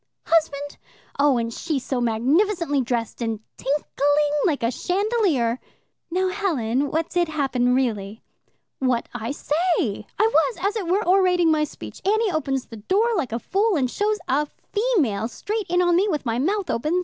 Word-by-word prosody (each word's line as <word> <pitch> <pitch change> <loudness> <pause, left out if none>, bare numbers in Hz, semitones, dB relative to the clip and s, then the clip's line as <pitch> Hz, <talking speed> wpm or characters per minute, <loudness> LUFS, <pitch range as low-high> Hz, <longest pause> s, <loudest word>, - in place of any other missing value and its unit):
husband?' 290 -3 0 0.4
Oh, 280 -3 +4
and 230 0 -2
she 315 +2 -2
so 260 -1 -2
magnificently 290 - +1
dressed 240 -2 -3
and 225 -2 -2 0.2
tinkling 290 +1 +1
like 290 -7 0
a 230 - +2
chandelier." 360 - 0 0.5
"Now, 370 +2 +1
Helen, 285 - 0
what 320 +1 -1
did 350 -1 +1
happen 265 -5 +1
really?" 220 -5 -2 0.6
"What 255 -3 0
I 230 -1 -4
say. 290 - -8 0.7
I 440 +2 +3
was, - - +3
as 400 +3 0
it 405 -6 -3
were, 375 +2 +1
orating 360 -3 +4
my 305 -1 +2
speech. - - -10
Annie 430 +1 +2
opens 275 -5 -1
the 225 - -10
door 390 - +1
like 310 - -1
a 230 - -1
fool, 395 - +1
and 255 -5 0
shows 425 +1 0
a 290 +3 +1 0.3
female 355 - +1
straight 415 - -4
in 355 +1 +3
on 350 -1 +3
me, 395 +3 +3
with 300 -6 -2
my 230 0 0
mouth 385 +7 0
open. 305 +10 0
300 Hz, 170 wpm, -23 LUFS, 250-375 Hz, 0.7 s, Oh